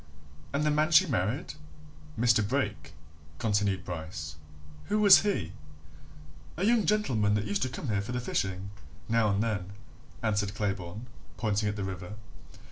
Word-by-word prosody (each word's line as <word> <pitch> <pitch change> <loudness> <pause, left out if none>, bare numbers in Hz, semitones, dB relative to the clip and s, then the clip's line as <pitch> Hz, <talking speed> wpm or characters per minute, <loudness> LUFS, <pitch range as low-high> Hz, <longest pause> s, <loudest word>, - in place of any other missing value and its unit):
"And 140 +1 0
the 150 - +2
man 155 +2 +2
she 170 +3 +7
married? 120 - -1 0.7
Mr. 120 -1 +4
Brake," - - -2 0.4
continued 105 -3 0
Bryce. 80 -3 -6 0.5
"Who 210 - 0
was 205 -2 +9
he?" 105 - -1 1.1
"A 185 - 0
young 225 -5 +3
gentleman 115 - +2
that 105 0 -1
used 100 -1 -1
to 130 - 0
come 125 +1 -5
here 100 -1 +1
for 100 - -6
the 125 - -1
fishing, 95 -4 -2 0.4
now 115 -1 +2
and 100 +2 +1
then," 100 -4 -3 0.5
answered 105 -2 0
Claybourne, 100 +1 -3 0.3
pointing 105 -2 0
at 105 - -3
the 100 - -3
river. 95 +1 -6
105 Hz, 150 wpm, -29 LUFS, 100-130 Hz, 1.1 s, was